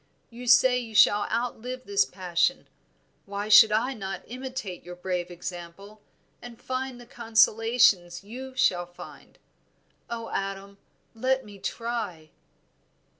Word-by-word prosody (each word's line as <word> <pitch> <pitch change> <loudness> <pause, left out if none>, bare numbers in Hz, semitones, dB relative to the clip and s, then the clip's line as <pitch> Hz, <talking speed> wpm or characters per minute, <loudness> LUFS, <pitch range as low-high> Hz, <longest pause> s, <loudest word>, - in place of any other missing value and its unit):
You 245 +1 -9
say 250 +1 +6
you 225 -3 -8
shall 205 0 +5
outlive 245 +2 -3
this 405 0 +2
passion; 180 +8 -1 0.6
why 200 +1 -4
should 215 +1 +9
not 220 +1 -1
I 195 0 -4
imitate 250 -7 -6
your 180 0 -9
brave 180 -1 -3
example, 175 +4 -9 0.4
and 240 -1 -11
find 260 -1 -4
the 240 - -12
consolations 225 -5 +3
you 255 +5 -9
shall 175 -8 +2
find? 175 - -13 0.7
Oh, 230 -1 -5
Adam, 195 0 -5 0.3
let 260 +3 0
me 205 -1 -12
try." 220 -10 -4
220 Hz, 125 wpm, -26 LUFS, 190-245 Hz, 0.7 s, should